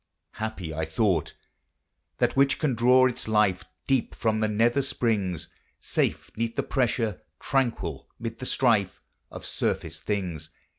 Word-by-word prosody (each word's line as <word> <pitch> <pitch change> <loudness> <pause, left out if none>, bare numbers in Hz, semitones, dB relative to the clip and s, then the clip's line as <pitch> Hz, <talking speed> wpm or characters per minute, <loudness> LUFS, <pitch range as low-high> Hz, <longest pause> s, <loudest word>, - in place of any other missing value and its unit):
Happy, 105 -7 -4
I 80 +1 -2
thought, 85 0 0 0.8
that - - +1
which 135 0 +4
can 150 -5 +1
draw 125 +2 +5
its 125 -2 -1
life 105 -4 +2 0.2
Deep 135 -3 +1
from 110 -1 +1
the 110 - +2
nether 115 +5 +2
springs, 100 - -1 0.3
Safe 80 +1 -1
'neath 115 +1 -2
the - - 0
pressure, 115 -5 0 0.2
tranquil 115 - -1
mid 115 0 -5
the 130 - -4
strife, 110 -7 +2 0.3
Of - - -8
surface - - -2
things. 90 -7 -3
110 Hz, 140 wpm, -27 LUFS, 90-120 Hz, 0.8 s, draw